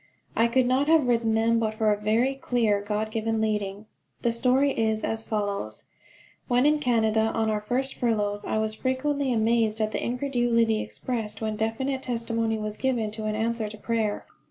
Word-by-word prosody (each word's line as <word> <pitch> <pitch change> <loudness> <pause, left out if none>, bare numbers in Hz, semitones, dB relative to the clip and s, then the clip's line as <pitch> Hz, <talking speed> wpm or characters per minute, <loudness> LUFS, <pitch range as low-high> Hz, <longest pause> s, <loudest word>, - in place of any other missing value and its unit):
I 230 - +4
could 250 +2 +2
not 260 +3 +2
have 320 -3 +5
written 230 -2 +2
them 230 +1 +3
but 220 -1 -1
for 215 -1 +2
a 205 - -5
very 230 +6 +2
clear, 235 -6 +1
God 210 +1 -2
given 225 0 -1
leading. 210 -1 -2 0.4
The 235 - +2
story 255 +4 +3
is 220 -3 0
as 225 0 -1
follows: 200 - -3 0.6
When 245 +2 +3
in 300 0 +4
Canada 220 -4 +2
on 220 -1 +1
our 210 -1 -1
first 260 +5 -1
furloughs 210 -3 -1
I - - -1
was 215 0 0
frequently 265 +3 -1
amazed 225 -1 +2
at 215 -1 0
the - - -3
incredulity 240 -3 +1
expressed 220 -4 -4
when 220 -1 -2
definite 260 +5 -1
testimony 230 -2 -1
was 215 -1 -4
given 240 -5 0
to 215 0 -6
an 215 0 -1
answer 225 0 -1
to 215 - -10
prayer. 220 -1 -1
225 Hz, 180 wpm, -26 LUFS, 215-245 Hz, 0.6 s, have